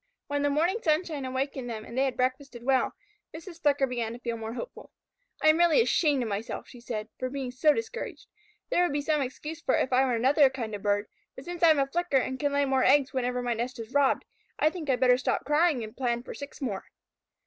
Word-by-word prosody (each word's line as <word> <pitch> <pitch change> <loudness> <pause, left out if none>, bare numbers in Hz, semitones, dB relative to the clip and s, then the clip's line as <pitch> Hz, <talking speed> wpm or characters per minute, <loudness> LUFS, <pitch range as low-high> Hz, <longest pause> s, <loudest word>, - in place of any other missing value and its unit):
When 285 0 -2
the 290 - +2
morning 335 +9 +1
sunshine 310 -4 0
awakened 260 -1 -3
them 220 -2 -5
and 235 - -9
they 265 +1 +2
had 260 -2 -2
breakfasted 255 -1 -2
well, 260 0 +1 0.4
Mrs. 335 +1 -10
Flicker 285 -2 +3
began 240 -3 -3
to 240 - -9
feel 235 -1 -3
more 225 0 -5
hopeful. - - -8 0.5
"I 310 - +7
am 310 +2 +4
really 345 +4 +5
ashamed 300 - +3
of 225 - -3
myself," 205 +3 -4
she 245 - -13
said, 220 -3 -4
"for 255 - -2
being 265 -2 -4
so 280 +5 +4
discouraged. 455 +6 -4 0.5
There - - +3
would 355 -5 +1
be 290 - 0
some 305 -1 +1
excuse 300 +5 -5
for 260 - +2
it - - +3
if 255 - -4
I 260 +1 +5
were 255 -3 +1
another 270 +4 +5
kind 240 -5 -5
of 205 - -5
bird, 205 0 +1 0.3
but - - -10
since 350 0 -6
I 335 - +7
am 310 - +5
a 275 - +3
Flicker 340 +1 0
and 260 0 -1
can 290 -1 0
lay 285 0 +2
more 265 -1 +2
eggs 280 +1 +4
whenever 250 -1 -1
my 240 -1 0
nest 240 +3 -3
is 230 +1 -8
robbed, 285 -1 +3 0.3
I 310 - +3
think 325 -5 -6
I'd 255 -2 +2
better 250 -1 +5
stop - - -1
crying 300 -3 +2
and 215 0 -9
plan 240 -2 -1
for - - -8
six 280 0 -9
more." 205 -8 -3
265 Hz, 245 wpm, -28 LUFS, 245-300 Hz, 0.5 s, I